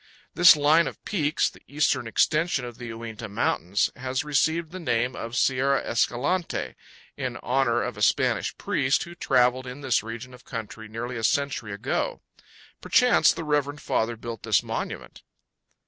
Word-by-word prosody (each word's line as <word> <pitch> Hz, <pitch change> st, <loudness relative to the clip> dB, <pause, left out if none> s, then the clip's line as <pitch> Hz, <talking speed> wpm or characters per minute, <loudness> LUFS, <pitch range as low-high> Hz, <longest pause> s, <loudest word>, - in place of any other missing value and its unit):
This 175 Hz, -1 st, +8 dB
line 155 Hz, +3 st, +4 dB
of -, -, -9 dB
peaks, 155 Hz, -7 st, +1 dB
the -, -, -10 dB
eastern 145 Hz, -4 st, 0 dB
extension 155 Hz, +4 st, +1 dB
of 120 Hz, -1 st, -9 dB
the 120 Hz, -, -6 dB
Uinta 115 Hz, -1 st, -7 dB
Mountains, 100 Hz, -1 st, 0 dB
has 130 Hz, +1 st, -2 dB
received 160 Hz, +3 st, 0 dB
the 185 Hz, -, -7 dB
name 125 Hz, -5 st, 0 dB
of 115 Hz, +1 st, -6 dB
Sierra 135 Hz, +2 st, +2 dB
Escalante, 145 Hz, +10 st, -1 dB, 0.4 s
in -, -, -3 dB
honor 125 Hz, -2 st, +1 dB
of 125 Hz, -, -4 dB
a -, -, -7 dB
Spanish 125 Hz, +2 st, +1 dB
priest 145 Hz, -9 st, +1 dB
who 170 Hz, -, -10 dB
traveled 130 Hz, -4 st, +2 dB
in 125 Hz, +3 st, -8 dB
this 130 Hz, -4 st, +1 dB
region 115 Hz, +3 st, -8 dB
of 125 Hz, -, -14 dB
country 110 Hz, -1 st, -7 dB
nearly 115 Hz, +3 st, -5 dB
a 115 Hz, -, -5 dB
century 140 Hz, -4 st, 0 dB
ago. 135 Hz, -, -2 dB, 0.6 s
Perchance 250 Hz, -1 st, +4 dB
the -, -, -5 dB
reverend 145 Hz, -1 st, 0 dB
father 115 Hz, -3 st, -1 dB
built 115 Hz, -1 st, -7 dB
this -, -, +2 dB
monument. -, -, -5 dB
130 Hz, 160 wpm, -25 LUFS, 115-150 Hz, 0.6 s, This